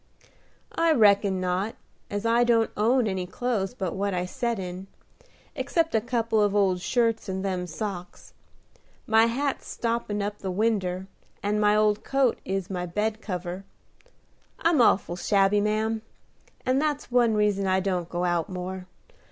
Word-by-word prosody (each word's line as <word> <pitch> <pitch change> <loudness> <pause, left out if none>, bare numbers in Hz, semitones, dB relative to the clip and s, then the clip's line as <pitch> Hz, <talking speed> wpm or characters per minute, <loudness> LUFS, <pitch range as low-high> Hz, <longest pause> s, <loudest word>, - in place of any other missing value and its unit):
"I 330 -1 +3
reckon 200 -5 +4
not 185 +4 -1 0.3
as 205 +2 -3
I 230 +1 +4
don't 230 -2 +3
own 235 +4 +3
any 190 -3 -2
clothes 225 +1 -2
but 185 -7 -3
what 200 0 -1
I 180 0 -1
set 235 +4 -2
in, 185 0 -6 0.7
except 330 -1 0
a 220 - +3
couple 230 -2 0
of 205 -1 +2
old 190 -3 +2
shirts 230 0 0
and 190 +1 -3
them 180 -2 -2
socks. 180 +1 -6 0.7
My 225 +1 +5
hat's 275 +4 -2
stoppin' 230 -3 -2
up 205 +1 -4
the 190 - -4
winder, 190 -2 0 0.4
and 210 +1 0
my 210 0 +4
old 210 0 +2
coat 270 -3 +1
is 195 -2 -2
my 180 -2 -4
bed 210 +5 -2
cover. 180 -1 -5 0.9
I'm 330 -5 +3
awful 190 -6 +3
shabby, 200 +1 +3
ma'am, 215 +1 0 0.6
and 260 +2 +2
that's 295 -3 -2
one 240 -3 +3
reason 205 -2 +1
I 190 0 +3
don't 180 -3 -2
go 175 +1 -1
out 175 -2 0
more. 185 0 -5
205 Hz, 155 wpm, -26 LUFS, 185-230 Hz, 0.9 s, My